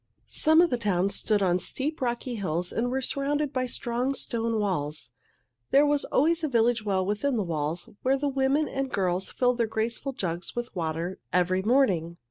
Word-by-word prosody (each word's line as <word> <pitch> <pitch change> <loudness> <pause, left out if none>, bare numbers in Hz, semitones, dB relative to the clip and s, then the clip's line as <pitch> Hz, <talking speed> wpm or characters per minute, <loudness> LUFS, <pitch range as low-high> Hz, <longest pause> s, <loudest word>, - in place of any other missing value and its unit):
Some 315 +1 +4
of 345 - +3
the 245 - 0
towns 200 -2 +1
stood 210 0 +1
on 180 -1 +2
steep, 295 - -3
rocky 245 0 -2
hills 180 -5 -2
and 240 +2 -1
were 265 +1 -1
surrounded 285 +2 -1
by 255 -1 0
strong, 245 +3 -1
stone 230 -3 -1
walls. 150 - -2 0.6
There 285 +2 +5
was 290 -1 +2
always 330 +4 +2
a 310 - 0
village 235 -2 +2
well 190 -3 0
within 210 +7 0
the 210 - +1
walls, 160 -1 -2
where 265 +1 +2
the 285 +1 -1
women 275 +2 +1
and 270 +1 -2
girls 185 -1 0
filled 250 -1 +1
their 230 - +2
graceful 230 +5 -2
jugs 175 -6 -4
with 240 -2 -4
water 165 +1 -3
every 180 +2 +2
morning. 190 -8 +2
230 Hz, 185 wpm, -27 LUFS, 185-270 Hz, 0.6 s, There